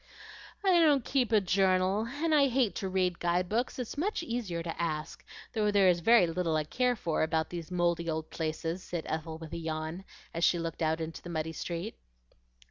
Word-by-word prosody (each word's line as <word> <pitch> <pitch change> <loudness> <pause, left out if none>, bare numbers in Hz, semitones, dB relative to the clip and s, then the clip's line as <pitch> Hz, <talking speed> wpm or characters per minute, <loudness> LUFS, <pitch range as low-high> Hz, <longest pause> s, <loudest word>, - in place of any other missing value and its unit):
"I 370 -3 +5
don't 295 -6 +4
keep 255 -4 +1
a 215 - +6
journal, 190 +2 +2
and 310 +4 -1
I 285 -2 +5
hate 250 -4 +1
to 195 -3 -3
read 185 -2 0
guide 175 +1 +1
books; 235 +6 -1
it's 250 +2 -5
much 380 +1 -1
easier 220 - -3
to 165 0 -4
ask, 155 -2 -3 0.3
though 215 -2 +1
there 200 -2 +5
is 175 -1 +3
very 225 +2 +6
little 165 -1 -1
I 155 - +1
care 250 +10 +1
for 170 -7 -1
about 160 0 0
these 170 -2 -6
mouldy 170 -1 0
old 160 0 -3
places," 165 +2 -3
said 175 -3 -5
Ethel 160 0 -3
with 160 -1 -9
a - - -3
yawn, 160 +2 -4 0.3
as 170 - -2
she 175 - +4
looked 165 0 -4
out 160 0 +1
into 160 0 -5
the 175 - -9
muddy 160 -1 -3
street. 175 +6 -5
175 Hz, 205 wpm, -30 LUFS, 165-225 Hz, 0.3 s, a